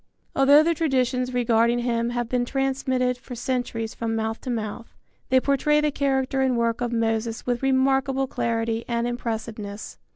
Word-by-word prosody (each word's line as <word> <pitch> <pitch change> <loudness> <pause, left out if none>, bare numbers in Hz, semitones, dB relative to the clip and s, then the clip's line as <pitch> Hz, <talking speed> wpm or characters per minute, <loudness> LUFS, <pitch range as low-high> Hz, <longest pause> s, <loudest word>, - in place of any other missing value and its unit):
Although 285 +3 +6
the 335 +1 +2
traditions 255 -5 0
regarding 235 -1 +2
him 235 -1 0
have 240 -1 -2
been 245 +1 0
transmitted 260 -1 0
for 250 0 -9
centuries 245 -3 -2
from 225 -1 -3
mouth 220 0 -2
to 255 - -6
mouth, 225 -1 -4 0.3
they 260 0 +5
portray 280 +3 +2
the 300 0 +1
character 270 -1 0
and 260 -2 +2
work 230 0 0
of 240 -1 -1
Moses 225 -1 -1
with 245 -1 -1
remarkable 270 0 +2
clarity 230 -2 -1
and 235 -1 -1
impressiveness. 220 -3 -5
245 Hz, 160 wpm, -24 LUFS, 230-265 Hz, 0.3 s, Although